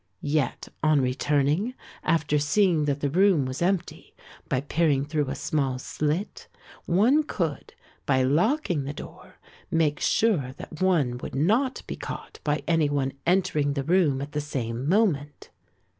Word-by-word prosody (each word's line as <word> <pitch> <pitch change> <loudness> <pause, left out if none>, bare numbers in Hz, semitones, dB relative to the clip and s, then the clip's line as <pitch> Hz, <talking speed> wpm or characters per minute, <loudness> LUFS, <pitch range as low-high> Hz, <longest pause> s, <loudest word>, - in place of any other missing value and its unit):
Yet 150 -5 0
on 155 -2 +4
returning, 145 - +1 0.3
after 155 -2 +1
seeing 160 +1 +2
that 145 -1 -1
the 145 - 0
room 185 -4 +4
was 130 +3 -5
empty, 180 0 -2 0.3
by 130 - +1
peering 145 -2 +1
through 150 -2 -1
a 135 - -3
small 135 -2 -1
slit, 150 +8 -3 0.4
one 225 - +4
could, 170 - -4 0.3
by 130 -2 +3
locking 170 - +1
the 140 - -4
door, - - -11 0.3
make 155 -3 +1
sure 155 - +1
that 155 - -10
one 150 -10 +2
would - - -7
not 220 - +1
be - - -6
caught - - -7
by 150 0 0
any 165 -3 +2
one 140 -2 -1
entering 155 -6 +2
the 140 -1 -2
room 155 -4 +2
at 145 - -8
the 150 - -2
same 130 -2 -3
moment. 165 -8 0
150 Hz, 150 wpm, -26 LUFS, 140-175 Hz, 0.4 s, on